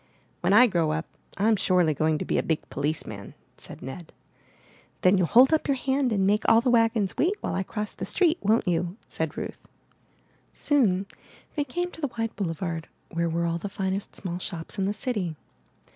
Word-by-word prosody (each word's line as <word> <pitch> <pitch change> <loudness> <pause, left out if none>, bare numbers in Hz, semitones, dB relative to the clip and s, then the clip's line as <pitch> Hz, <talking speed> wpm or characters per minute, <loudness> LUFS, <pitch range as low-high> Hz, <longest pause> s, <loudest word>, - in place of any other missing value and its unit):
''When 175 - +3
I 225 +5 +8
grow 170 -8 +1
up, 160 +1 -2 0.3
Fm 215 +1 +3
surely 180 -5 +3
going 155 +2 +1
to - - -4
be - - +1
a - - +2
big 160 -2 -2
policeman,'' 140 -9 -3 0.2
said - - -9
Ned. 155 +6 -8 0.9
''Then 185 +1 +5
you'll 180 - +2
hold 260 - +6
up 315 - +2
your 275 -2 +2
hand 265 0 +1
and 195 -3 +2
make 210 +2 +3
all 225 - +7
the 250 +1 +1
wagons 225 -4 +2
wait 365 +6 +2
while - - -2
I 190 - 0
cross 210 +2 -4
the - - -7
street, 345 -3 +2
won't 215 +1 +2
you?" 175 +2 0
said - - -3
Ruth. - - -5 0.9
Soon 205 -10 +2 0.5
they 295 - 0
came 350 +6 -3
to 325 - -12
the 285 - 0
wide 225 -1 -2
boulevard 165 -3 -3 0.2
where 170 0 0
were 170 +1 0
all 170 0 -1
the 205 - -5
finest 190 +1 -3
small 180 -2 -4
shops 175 +2 -5
in 190 - +1
the 200 - 0
city. 205 -7 -2
195 Hz, 195 wpm, -26 LUFS, 170-235 Hz, 0.9 s, I